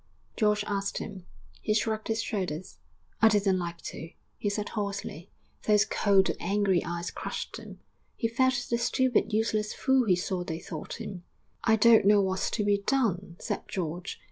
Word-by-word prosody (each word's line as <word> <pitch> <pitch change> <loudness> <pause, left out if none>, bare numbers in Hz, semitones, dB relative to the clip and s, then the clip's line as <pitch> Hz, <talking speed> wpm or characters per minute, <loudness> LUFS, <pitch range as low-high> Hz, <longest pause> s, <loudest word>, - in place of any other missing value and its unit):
George 210 -2 +2
asked 200 -1 -2
him. 190 -4 -7 0.3
He 215 - +1
shrugged 220 0 0
his 225 0 0
shoulders. 185 -5 -4 0.4
'I 225 - +8
didn't 200 -3 +3
like 170 -1 -4
to,' 165 - -6 0.3
he 205 - -2
said 205 0 -2
hoarsely; 200 -5 -4 0.4
those 210 -1 +5
cold, 195 -2 +3
angry 195 -1 +1
eyes 170 0 -4
crushed - - -5
him; - - -11 0.4
he 230 - 0
felt 250 +2 +1
the 235 - +2
stupid, 250 0 +2
useless 215 0 0
fool 265 -2 +3
he 185 - +5
saw 180 0 -2
they 165 -3 -4
thought 165 +4 -7
him. 195 -6 -7 0.4
'I 220 - +5
don't 225 -1 +6
know 205 0 +7
what's 190 -1 0
to 210 - -1
be 205 0 +3
done,' 200 -7 0
said - - -3
George. 175 0 -4
205 Hz, 170 wpm, -28 LUFS, 185-220 Hz, 0.4 s, I